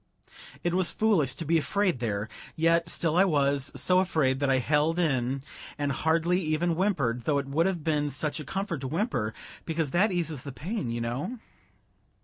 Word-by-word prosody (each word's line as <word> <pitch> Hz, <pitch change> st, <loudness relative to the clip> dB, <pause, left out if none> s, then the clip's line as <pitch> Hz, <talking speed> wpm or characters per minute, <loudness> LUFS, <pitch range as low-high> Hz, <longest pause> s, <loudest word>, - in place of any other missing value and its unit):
It 175 Hz, -1 st, 0 dB
was 185 Hz, -1 st, +3 dB
foolish 175 Hz, -, +2 dB
to 165 Hz, -, -5 dB
be 165 Hz, +2 st, +3 dB
afraid 190 Hz, -2 st, 0 dB
there, 105 Hz, -3 st, -2 dB, 0.3 s
yet 165 Hz, +1 st, +2 dB
still 165 Hz, -2 st, 0 dB
I 185 Hz, -, +6 dB
was; 140 Hz, -5 st, +1 dB
so 180 Hz, 0 st, +3 dB
afraid 155 Hz, -8 st, +1 dB
that 140 Hz, -1 st, +1 dB
I 135 Hz, -, +4 dB
held 150 Hz, +5 st, +1 dB
in 135 Hz, -5 st, 0 dB, 0.3 s
and 145 Hz, -1 st, -1 dB
hardly 165 Hz, +5 st, +1 dB
even 155 Hz, +1 st, 0 dB
whimpered, 145 Hz, -, 0 dB
though 150 Hz, -2 st, +2 dB
it 140 Hz, -, -1 dB
would 155 Hz, +6 st, +1 dB
have 180 Hz, -5 st, -2 dB
been 150 Hz, -2 st, +1 dB
such 145 Hz, +2 st, -1 dB
a -, -, -5 dB
comfort 180 Hz, -1 st, -3 dB
to 135 Hz, -, -3 dB
whimper, 135 Hz, -, -1 dB, 0.3 s
because 160 Hz, -3 st, -2 dB
that 195 Hz, +7 st, +3 dB
eases 165 Hz, -6 st, -2 dB
the 140 Hz, -, -7 dB
pain, 160 Hz, -, -4 dB
you 115 Hz, 0 st, -2 dB
know. 125 Hz, -, -3 dB
155 Hz, 185 wpm, -28 LUFS, 135-175 Hz, 0.3 s, I